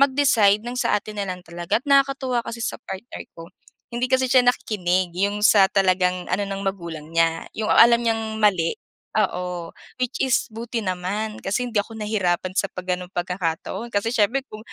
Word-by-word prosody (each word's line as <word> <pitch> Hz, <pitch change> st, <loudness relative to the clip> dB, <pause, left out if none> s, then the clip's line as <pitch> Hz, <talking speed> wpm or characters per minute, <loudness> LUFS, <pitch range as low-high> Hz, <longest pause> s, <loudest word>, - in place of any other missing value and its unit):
mag-decide 260 Hz, -7 st, +4 dB
ng 245 Hz, -, -4 dB
sa 210 Hz, -, +2 dB
atin 210 Hz, 0 st, -10 dB
na 195 Hz, -, -3 dB
lang 180 Hz, 0 st, -5 dB
talaga 170 Hz, +4 st, -1 dB
at 245 Hz, -, -23 dB
nakakatuwa 275 Hz, -3 st, +2 dB
kasi 230 Hz, -, -7 dB
sa -, -, -2 dB
partner 195 Hz, +5 st, -7 dB, 0.2 s
ko, 165 Hz, 0 st, -9 dB, 0.5 s
hindi 245 Hz, +1 st, 0 dB
kasi 260 Hz, 0 st, +3 dB
siya 255 Hz, 0 st, +5 dB
nakikinig. 185 Hz, -7 st, +1 dB
'Yong 200 Hz, +3 st, 0 dB
sa 195 Hz, -3 st, +5 dB
talagang 185 Hz, -2 st, +2 dB
ano 185 Hz, +3 st, 0 dB
ng 195 Hz, 0 st, -4 dB
magulang 170 Hz, -5 st, -4 dB
niya 165 Hz, 0 st, +1 dB
'yong 215 Hz, -1 st, -2 dB
alam 235 Hz, 0 st, +6 dB
niyang 225 Hz, -1 st, -1 dB
mali 185 Hz, -6 st, +3 dB, 0.4 s
oo, 180 Hz, -4 st, -1 dB, 0.3 s
which 250 Hz, -, -2 dB
is 260 Hz, -3 st, +1 dB
buti 230 Hz, +1 st, -4 dB
naman 200 Hz, +3 st, -3 dB
kasi 205 Hz, +6 st, -1 dB
hindi 235 Hz, -3 st, -1 dB
ako 205 Hz, +2 st, -2 dB
nahirapan 200 Hz, -5 st, -1 dB
sa -, -, +2 dB
'pag 185 Hz, -1 st, -8 dB
gano'ng 180 Hz, 0 st, -8 dB
pagkakataon 175 Hz, +4 st, -3 dB
kasi 205 Hz, +3 st, +1 dB
siyempre 235 Hz, +3 st, +2 dB
kung 215 Hz, -, -8 dB
205 Hz, 180 wpm, -23 LUFS, 180-235 Hz, 0.5 s, alam